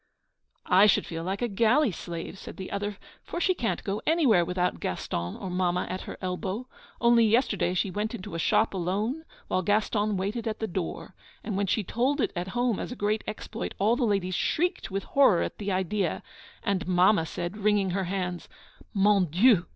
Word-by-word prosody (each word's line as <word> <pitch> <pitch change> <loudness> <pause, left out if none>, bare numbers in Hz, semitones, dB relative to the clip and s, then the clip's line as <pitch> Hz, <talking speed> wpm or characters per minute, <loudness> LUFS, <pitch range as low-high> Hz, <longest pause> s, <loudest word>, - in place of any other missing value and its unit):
'I 190 +3 +6
should 205 - +3
feel 165 -1 -5
like 190 +6 -2
a - - +2
galley 235 +5 +3
slave,' 170 +2 -6
said - - -9
the 190 - -7
other. 205 0 -3 0.2
'For 345 - -5
she 370 +1 +3
can't 225 - -2
go 200 +2 -2
anywhere 275 - +4
without 180 +1 -1
Gaston 85 +1 -3
or 190 - -5
Mamma 180 0 0
at 185 - -3
her - - -7
elbow. 190 +6 -3 0.3
Only 235 0 +5
yesterday 215 -5 +2
she 185 +1 0
went 210 +5 -2
into 185 -6 -8
a 165 - -3
shop 215 +5 +2
alone, 205 - -2 0.2
while 185 - +1
Gaston 205 +1 +1
waited 210 +5 -2
at 220 0 -2
the 220 - -2
door. 180 -4 -4 0.3
And 210 - -3
when 200 0 0
she 210 +3 +1
told 255 - 0
it - - 0
at 175 +1 -3
home 240 -4 +1
as - - -5
a - - -4
great 210 -1 0
exploit 215 +1 -5
all 215 +4 +3
the 250 - -1
ladies 195 -4 0
shrieked 350 - 0
with 195 +1 -3
horror 265 -11 +4
at - - -5
the 205 -1 -2
idea, 190 -1 -1 0.4
and 195 -3 -1
Mamma 180 -1 +4
said, 175 +5 -4
wringing 205 -2 +2
her 190 +1 -1
hands: 180 -1 -3 0.5
"_Mon 195 -3 +4
Dieu! 185 - +4
200 Hz, 195 wpm, -27 LUFS, 185-220 Hz, 0.5 s, I